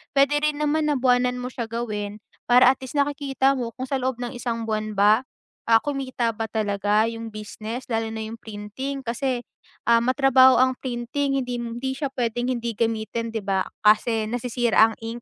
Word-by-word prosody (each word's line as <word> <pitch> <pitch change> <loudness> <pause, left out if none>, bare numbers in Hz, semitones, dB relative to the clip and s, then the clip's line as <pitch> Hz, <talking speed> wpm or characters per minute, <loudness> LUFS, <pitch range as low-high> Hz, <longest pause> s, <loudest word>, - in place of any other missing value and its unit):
Puwede 280 +2 +4
rin 300 0 0
naman 300 +1 +1
na 295 - +2
buwanan 250 -1 +2
mo 250 - -5
siya 235 -2 -4
gawin 215 -2 -4 0.2
para 250 +1 +7
at 265 - -5
least 260 +2 -9
nakikita 280 -1 +1
mo 245 -4 -3
kung 260 - -5
sa 265 +1 -2
loob 260 0 -1
ng 245 0 -5
isang 240 -2 -3
buwan 215 -1 -3
ba, 210 +5 +4 0.4
ah, 225 -1 +5
kumita 260 -5 -1
ba 225 0 -4
talaga 205 -1 +1
yung 230 0 -6
business, 215 +3 -6
lalo 225 0 0
na 220 - -4
yung 230 - -8
printing 220 +7 -6
kasi, 245 +1 -2 0.5
ah, 235 - +7
matrabaho 260 +1 +5
ang 260 0 +2
printing 265 +3 -2
hindi 250 -1 -3
hindi 240 +3 -4
siya 280 -2 -3
puwedeng 245 0 -1
hindi 235 -1 -3
gamitin, 230 0 -1
'di 220 - -2
ba? 190 -1 0 0.2
Kasi 220 +1 +4
nasisira 235 -2 +2
ang - - -13
ink. 230 +1 -6
240 Hz, 185 wpm, -24 LUFS, 225-260 Hz, 0.5 s, para